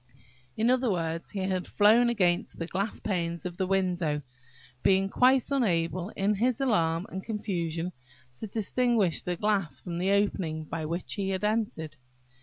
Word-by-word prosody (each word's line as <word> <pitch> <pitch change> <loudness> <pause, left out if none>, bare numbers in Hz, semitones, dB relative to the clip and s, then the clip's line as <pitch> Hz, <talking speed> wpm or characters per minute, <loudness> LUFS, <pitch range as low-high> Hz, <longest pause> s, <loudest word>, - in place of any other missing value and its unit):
In 230 +3 +3
other 255 -1 +2
words, 165 -3 -2
he 200 - -4
had 185 -1 -1
flown 225 +4 +5
against 180 -7 +1
the 165 - -3
glass 195 +5 -2
panes 170 -5 -2
of 175 -1 -5
the 190 - 0
window, 175 -6 0 0.6
being 195 0 +3
quite 255 +4 +3
unable, 185 -8 +1
in 200 +2 +1
his 235 +4 +1
alarm 170 -10 +1
and 190 0 -5
confusion, 180 -6 -3 0.5
to 220 - -5
distinguish 220 -3 +1
the 180 - -2
glass 195 -8 0
from 170 -2 -5
the 185 +2 +1
opening 190 -6 +1
by 160 +1 -4
which 170 +3 -2
he 195 -1 -2
had 190 0 -2
entered. 210 -8 -1
190 Hz, 160 wpm, -28 LUFS, 170-215 Hz, 0.6 s, flown